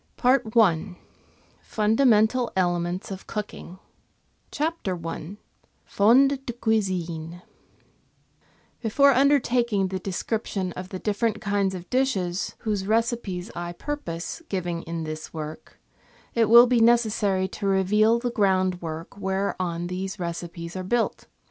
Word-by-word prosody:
PART 255 -1 +3
I 180 -3 +3 0.6
FUNDAMENTAL 225 +2 +2
ELEMENTS 175 +1 -1
OF 190 0 -8
COOKING 210 -4 -6 0.7
CHAPTER 300 - -2
I 165 +4 -6 0.5
FONDS 265 +7 +4
DE 240 - -5
CUISINE 180 -7 -2 1.4
Before 275 +5 +4
undertaking 245 -7 +2
the 190 0 -3
description 195 0 -3
of 185 +1 -7
the 190 - -5
different 215 +2 -1
kinds 200 -2 0
of 180 -1 -8
dishes 200 -9 0
whose 205 -4 -2
recipes 220 -5 -1
I 175 0 -4
purpose 175 - -5
giving 175 -3 -2
in 165 0 -4
this 155 +1 -7
work, 155 0 -8 0.5
it 225 -2 +2
will 235 +2 +9
be 245 -1 +2
necessary 215 -5 +3
to 200 - -4
reveal 210 +4 +3
the 240 0 -2
groundwork 185 -6 -1
whereon 190 -3 -2
these 190 +3 -4
recipes 170 -1 -6
are 185 - -3
built. 225 +5 -1
195 Hz, 115 wpm, -25 LUFS, 180-230 Hz, 1.4 s, will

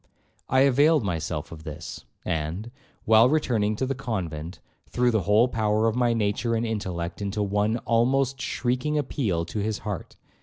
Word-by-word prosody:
I 130 +1 +4
availed 140 +2 +4
myself 80 -5 -3
of 80 -1 -10
this, 75 -3 -8 0.2
and, 85 +9 -3 0.3
while 110 +2 +6
returning 115 -8 +1
to 130 - -1
the 135 - -1
convent, 90 - -4 0.3
threw 125 0 +2
the 110 -3 +1
whole 110 +4 +5
power 110 -2 +1
of 110 - 0
my 120 -1 +2
nature 115 +1 0
and 115 +1 0
intellect 95 -6 -3
into 100 +1 -1
one 105 +3 +1
(almost) 130 +3 +2
shrieking 130 +4 -1
appeal 110 - -1
to 105 - -4
his 105 0 -1
heart. 100 -5 -5
110 Hz, 160 wpm, -26 LUFS, 100-125 Hz, 0.3 s, while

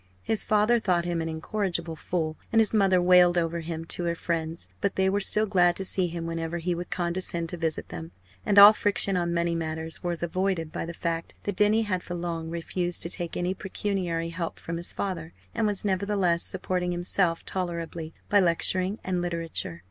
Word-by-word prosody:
His 220 - 0
father 215 +3 +3
thought 180 -5 +1
him 170 -1 -1
an 165 - -3
incorrigible 170 0 -2
fool, 160 -1 -2 0.2
and 225 - +4
his 220 0 +4
mother 195 -4 +4
wailed 180 0 +5
over 170 0 0
him 165 0 -5
to 175 +1 -1
her 170 0 0
friends. 165 - -3
But 200 - 0
they 190 0 +2
were 200 - +1
still 210 +2 +3
glad 175 -4 +3
to 190 - -4
see 185 -1 +2
him 170 0 -5
whenever 165 0 -3
he 175 +1 -1
would 175 0 -5
condescend 170 -1 -2
to 175 - -4
visit 160 -2 -2
them; 80 0 -7 0.3
and 200 - +1
all 205 +1 +11
friction 200 -2 +2
on 175 -1 0
money 170 0 0
matters 160 -1 -3
was 175 -1 -2
avoided 175 -2 -1
by - - -4
the 170 - -6
fact 165 -1 -3
that 205 - -3
Denny 210 +3 +3
had 185 -4 -1
for 175 - -6
long 170 -2 -4
refused 175 +1 -2
to 170 - -3
take 175 -3 -2
any 180 +1 0
pecuniary 185 -4 -2
help 165 0 -4
from 165 0 -5
his 170 - -1
father, 170 -4 -4 0.2
and 225 -2 +1
was 205 0 -1
nevertheless 190 -3 +1
supporting 180 -1 -2
himself 175 -1 0
tolerably 170 -3 -4 0.2
by 205 - +4
lecturing 185 +2 +1
and 180 -1 -1
literature. 165 - -3
175 Hz, 200 wpm, -27 LUFS, 165-190 Hz, 0.3 s, all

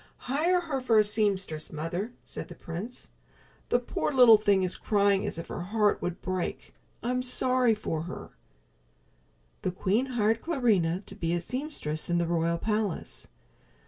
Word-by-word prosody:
"Hire 330 +8 +2
her 295 -6 -3
for 235 -3 +3
a 215 - +7
seamstress, 200 -7 0
mother," 170 +8 -3
said - - -7
the 175 - -10
prince. 180 +10 -7 0.6
"The - - +4
poor 245 +4 -2
little 245 -5 +8
thing 200 -3 +3
is 185 - 0
crying 200 -2 +2
as - - -4
if 165 - -7
her - - -4
heart 205 +3 +1
would 180 +1 -4
break. 185 -1 -3 0.3
I'm 250 +1 0
sorry 250 -2 +2
for 165 -7 -3
her." - - -8 1.3
The - - 0
queen 205 +7 0
hired 225 +1 +2
Clarinha 210 - +1
to - - -8
be 175 -4 -1
a - - 0
seamstress 210 - -4
in 175 - +2
the 170 - +1
royal 170 0 +1
palace. 210 -1 -2
205 Hz, 160 wpm, -28 LUFS, 175-245 Hz, 1.3 s, little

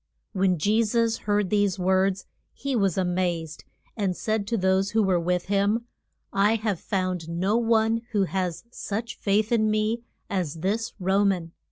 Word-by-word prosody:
] - - -52
When 185 -2 +3
Je 210 +8 +2
sus 230 +1 +1
heard 205 -2 +1
these 205 -3 +2
words 190 +1 +1 0.3
he 275 -1 -3
was 195 -6 +1
a 190 - +2
mazed, 175 -3 -2 0.3
and 195 -5 -1
said 215 -2 -1
to 230 - 0
those 190 0 +2
who 220 0 +3
were 185 -3 +2
with 180 +1 0
him, 205 +4 +1 0.5
I 205 +3 +3
have 210 -5 -1
found 185 -4 -2
no 185 +5 0
one 225 -1 +2
who 205 -3 +2
has 185 -2 -2
such 225 0 -5
faith 210 +2 +1
in 220 -2 +3
me 215 +2 0 0.3
as 180 -7 -2
this 215 +5 -1
Ro 190 +2 +2
man. 180 -5 0
200 Hz, 175 wpm, -26 LUFS, 185-220 Hz, 0.5 s, When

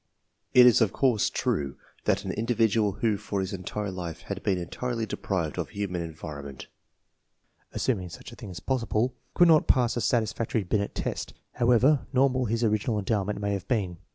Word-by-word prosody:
It 125 -1 +9
is, 120 -1 +6
of 110 -4 +3
course, 125 -6 +2
true 70 -2 -1 0.3
that - - +1
an - - -2
individual 110 -2 +1
who 105 +1 0
for 100 -1 -3
his 95 +1 -3
entire 100 +2 -4
life 90 -3 -6
had - - -5
been 95 -2 +1
entirely 115 +7 -3
deprived 85 -8 -3
of - - -3
human 100 -4 -3
en 80 -2 -6
vironment 70 -4 -8 1.1
(assuming 95 -9 -1
such - - -10
a - - -10
thing 95 - -9
to 90 - -7
be - - -27
possible) 120 -1 0 0.2
could 175 - +6
not 160 -2 +5
pass 120 -2 +3
a 120 - -1
satisfactory 115 0 0
Binet 100 +2 -1
test, - - -4 0.2
however 125 +4 +3
nor 135 +1 +4
mal 130 0 0
his 115 +1 -1
original 110 0 +1
endowment 105 0 -1
may 100 0 -1
have 100 -3 -4
been. 95 -8 -1
105 Hz, 185 wpm, -27 LUFS, 95-120 Hz, 1.1 s, It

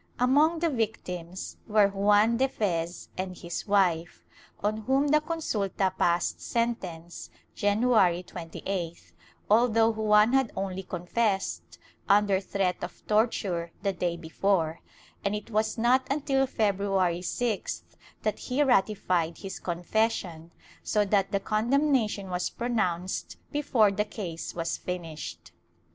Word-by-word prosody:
Among 290 +7 +4
the 335 0 +1
victims 185 -7 -4
were 210 -2 +5
Juan 205 +3 +3
de 265 +2 +3
Fez 175 -7 -2
and 185 -1 -4
his 170 +4 -5
wife, 180 -4 +1 0.4
on 210 +1 +1
whom 265 +6 +1
the 305 +1 +4
consulta 205 - -1
passed 175 -1 +1
sentence, 185 -8 -3 0.2
January 205 -4 +3
28th, 170 0 -6 0.4
although 225 +1 +4
Juan 215 +1 +4
had 265 -3 +3
only 190 -1 -3
confessed, 190 +3 -2 0.3
under 200 -1 +4
threat 190 -1 -1
of 175 - -8
torture, 205 -6 +1
the 200 -1 +1
day 175 -1 -2
before, 165 -1 0 0.4
and 200 +1 0
it 210 +2 -7
was 215 +2 0
not 245 +3 +3
until 275 -1 +1
Feb 210 -6 +1
ruary 190 -4 +1
6th 185 - -2 0.4
that 215 -1 -1
he 265 +3 0
ratified 190 - +1
his 195 -1 -7
confession, 175 -2 -1 0.3
so 210 -1 +1
that 195 -1 +1
the 200 - +1
condemnation 220 -2 +1
was 180 0 -1
pronounced 190 -7 -2
before 255 -8 +3
the 210 +1 0
case 180 -6 -6
was 165 -1 -2
finished. 155 - -6
200 Hz, 125 wpm, -28 LUFS, 180-230 Hz, 0.4 s, were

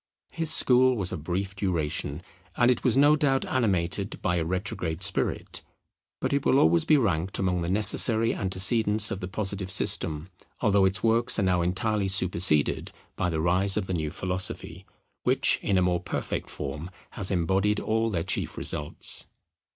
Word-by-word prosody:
His 165 -1 0
school 130 0 +3
was 95 -3 -2
of 75 - -6
brief 95 +4 -3
duration, 80 -5 -3 0.3
and 120 +1 +4
it 125 - -2
was 125 -1 +1
no 145 +2 +5
doubt 135 -3 0
animated 100 -5 -1
by 90 0 0
a 85 - 0
retrograde 90 -1 -3
spirit; 95 +1 -2 0.6
but - - -2
it 140 -1 0
will 135 - +3
always 85 -6 +3
be 155 - +4
ranked 95 - -1
among 90 -2 -1
the 85 - -3
necessary 110 +3 +2
antecedents 105 +3 +2
of 100 - -4
the 90 - -6
Positive 100 -1 -4
system; 80 -4 +1 0.3
although 100 -4 +2
its 95 -1 -1
works 115 +2 +2
are 100 - 0
now 90 -2 +1
entirely 100 +3 -1
superseded 90 -5 +2 0.2
by 90 - -1
the 80 -2 -2
rise 95 +4 +1
of 105 - -1
the 95 - -4
new 80 -3 -2
philosophy, 90 +1 -5 0.3
which - - +2
in 100 - 0
a 90 - +2
more 90 -1 0
perfect 90 - -5
form 75 +4 -6 0.2
has 100 -5 +1
embodied 95 +3 0
all 110 +1 -1
their 85 -6 -2
chief - - -2
results. 75 0 -2
95 Hz, 170 wpm, -26 LUFS, 90-110 Hz, 0.6 s, no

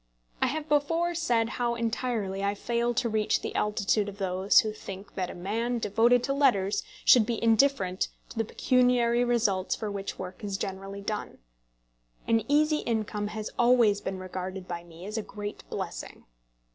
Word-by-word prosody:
I - - +4
have 305 +3 -3
before 330 +4 +1
said 240 -9 +1
how 235 -1 +1
entirely 225 -4 -2
I 200 +1 0
fail 235 +2 -1
to 235 - +1
reach 215 -1 +1
the - - -4
altitude 210 0 +1
of 200 - -10
those 190 +2 +4
who 215 -2 -3
think 195 -1 -9
that 185 -2 -2
a - - -7
man 225 +7 -2
devoted 235 +3 +3
to 275 - 0
letters 225 -9 +2 0.2
should 245 - +8
be 225 +1 -2
indifferent 225 -5 +3 0.2
to 225 - -7
the - - +3
pecuniary 245 0 +2
results 220 -6 +1
for 215 -2 -4
which 200 -1 -5
work 185 +2 -8
is 200 -2 -2
generally 195 0 -5
done. 210 +1 -4 0.9
An 225 -1 +3
easy 305 +2 +3
income 215 -2 -2
has 215 0 -5
always 235 -4 +4
been 190 - -4
regarded 185 0 -6
by 170 -1 -5
me 170 +1 -12
as 215 +2 -3
a - - -1
great 205 0 -7
blessing. - - -6
215 Hz, 170 wpm, -28 LUFS, 195-240 Hz, 0.9 s, should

